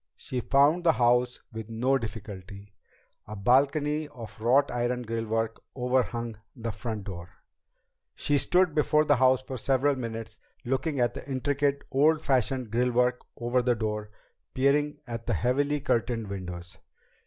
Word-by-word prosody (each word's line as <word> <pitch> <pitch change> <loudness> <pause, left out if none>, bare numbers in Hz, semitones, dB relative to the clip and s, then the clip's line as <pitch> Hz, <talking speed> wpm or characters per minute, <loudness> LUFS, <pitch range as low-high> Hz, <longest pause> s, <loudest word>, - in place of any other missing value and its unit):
She 125 - -4
found 145 +8 +3
the 165 -2 +5
house 125 +1 +2
with 110 0 -7
no 125 +4 +1
difficulty. 100 -3 -8 0.5
A 105 - -6
balcony 145 +7 +2
of 115 -5 -11
wrought 135 +5 +3
iron 125 0 -1
grillwork 115 0 -2 0.2
overhung 125 -3 -1 0.2
the 115 -2 -4
front 110 -2 -5
door. 90 -3 -7 0.9
She 145 -1 +1
stood 180 0 +3
before 150 0 +3
the 145 -2 +4
house 130 0 +4
for 130 -1 -6
several 135 +3 +2
minutes, 115 -3 -6 0.3
looking 135 +3 -1
at 120 -1 +2
the - - -9
intricate, 140 +1 0
old 150 +4 +4
fashioned 130 -4 0
grillwork 125 +1 +2 0.2
over 120 +2 +1
the 120 0 +2
door, 105 -1 -3 0.5
peering 145 +3 +2
at 115 -2 -6
the - - +1
heavily 145 +4 +1
curtained 115 -4 -1
windows. 90 -2 -7
125 Hz, 145 wpm, -28 LUFS, 115-140 Hz, 0.9 s, the